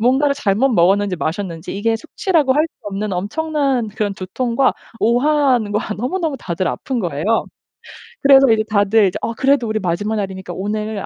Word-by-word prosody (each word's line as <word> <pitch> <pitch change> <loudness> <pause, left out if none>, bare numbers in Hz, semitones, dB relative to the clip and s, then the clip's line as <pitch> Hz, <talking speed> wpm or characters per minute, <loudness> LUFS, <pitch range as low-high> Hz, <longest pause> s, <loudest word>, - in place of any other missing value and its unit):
뭔가를 270 +4 +3
잘못 225 +1 +1
먹었는지 195 0 +2
마셨는지 170 +1 -4
이게 225 +2 0
숙취라고 320 - 0
할 305 +2 +3
수 320 - -12
없는 205 0 -3
엄청난 270 - -1
그런 205 -1 -3
두통과 235 +7 0 0.3
오한과 245 -4 +1
너무너무 305 - -2
다들 180 -3 -2
아픈 260 -3 -3
거예요. 160 -5 -3 1.0
그래서 275 -1 +7
이제 220 -1 +3
다들 205 0 +3
이제 180 - -3
"어 230 - -1
그래도 265 -1 +2
우리 215 0 -1
마지막 205 +4 -2
날이니까 190 -3 -5
오늘 210 +2 -3
220 Hz, 375 characters per minute, -18 LUFS, 195-270 Hz, 1.0 s, 그래서